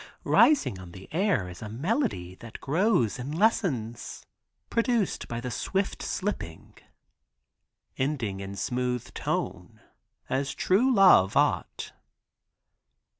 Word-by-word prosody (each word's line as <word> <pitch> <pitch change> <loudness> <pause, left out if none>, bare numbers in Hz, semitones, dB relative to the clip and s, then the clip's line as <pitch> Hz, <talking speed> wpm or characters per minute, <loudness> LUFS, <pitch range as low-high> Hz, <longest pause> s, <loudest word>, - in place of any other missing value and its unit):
rising 285 - +4
on 90 -2 -11
the 95 +1 -11
air 180 - +1
is 90 0 -10
a 110 - -6
melody, 140 - -1
that 115 +4 -11
grows 155 - +1
and 140 +5 -4
lessens, 135 - 0 0.4
produced 230 -4 0
by 115 - -4
the 125 +1 -5
swift 195 - -2
slipping. 185 - -4 1.3
Ending 130 -8 -1
in 100 0 -6
smooth 125 +3 -2
tone - - -3 0.5
as 135 +1 -1
true 230 +8 +3
love 190 - +6
ought. - - 0
130 Hz, 110 wpm, -27 LUFS, -, 1.3 s, love